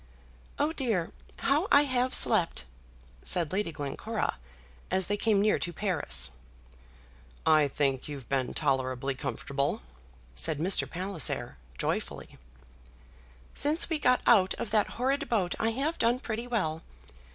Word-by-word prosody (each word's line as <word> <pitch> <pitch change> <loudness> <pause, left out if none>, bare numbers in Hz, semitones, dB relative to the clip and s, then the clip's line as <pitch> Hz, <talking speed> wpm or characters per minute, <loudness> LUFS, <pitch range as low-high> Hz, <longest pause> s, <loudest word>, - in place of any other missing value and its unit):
"Oh, 300 +2 0
dear! 225 - -1 0.3
how 295 +7 +1
I 285 - +7
have 255 -2 0
slept!" 170 - +3 0.6
said 170 -2 +1
Lady 195 -3 -1
Glencora, 145 -3 -3 0.5
as 190 -1 +1
they 205 - -1
came 210 -1 +2
near 210 +1 +2
to 175 - -3
Paris. 180 -2 +2 1.1
"I 155 -2 +5
think 135 -2 -1
you've 140 -5 -8
been 130 -2 -1
tolerably 130 0 0
comfortable," 140 - -3 0.5
said 155 - +2
Mr. 180 +6 +2
Palliser, 170 - -1 0.2
joyfully. - - -4 1.1
"Since 305 +4 0
we 315 - +1
got 250 -3 +3
out 190 -5 +4
of 220 - -5
that 215 -2 +3
horrid 265 +3 0
boat 195 -7 0
I 225 - +1
have 275 +8 -2
done 235 +2 +2
pretty 235 -1 -4
well. 165 -10 -1
190 Hz, 130 wpm, -29 LUFS, 150-245 Hz, 1.1 s, I